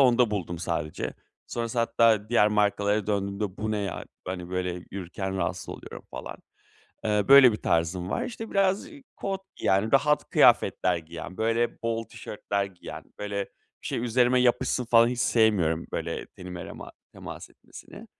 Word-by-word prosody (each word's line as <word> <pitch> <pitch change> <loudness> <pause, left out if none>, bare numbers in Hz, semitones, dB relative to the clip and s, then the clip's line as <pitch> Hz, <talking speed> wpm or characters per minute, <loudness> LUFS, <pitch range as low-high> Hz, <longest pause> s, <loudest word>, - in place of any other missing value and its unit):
onda 125 -3 +5
buldum 90 -4 -3
sadece. 80 -3 -3 0.3
Sonrası 115 0 -3
hatta 115 -2 +3
diğer 105 -3 +4
markalara 105 0 +1
döndüğümde 100 -1 -2
bu 110 0 -3
ne 105 - 0
ya, 100 -3 -4 0.2
hani, 90 -1 -5
böyle 90 -1 -2
yürürken 95 +1 -4
rahatsız - - -2
oluyorum - - -8
falan. - - -7 0.7
Eee, 105 -2 +2
böyle 135 -4 +9
bir - - -2
tarzım 85 +2 0
var, - - -1
işte, 225 -2 -6
biraz 195 0 +2 0.3
kot, 195 -1 -3 0.2
yani 100 +5 +2
rahat 150 +2 +3
kıyafetler 90 -1 +4
giyen, 85 +3 -8
böyle 115 +1 0
bol 115 0 -1
tişörtler 100 -2 -3
giyen; 95 -3 -9
böyle 100 -1 -3 0.4
bir - - -7
şey - - -2
üzerime 125 +1 +3
yapışsın 125 0 +2
falan 115 0 +5
hiç 125 -1 -3
sevmiyorum. 95 -10 +2
Böyle 85 0 -3
tenime 90 -1 -8
rema - - -9 0.2
temas - - -9
etmesini, - - -13
105 Hz, 150 wpm, -27 LUFS, 95-120 Hz, 0.7 s, böyle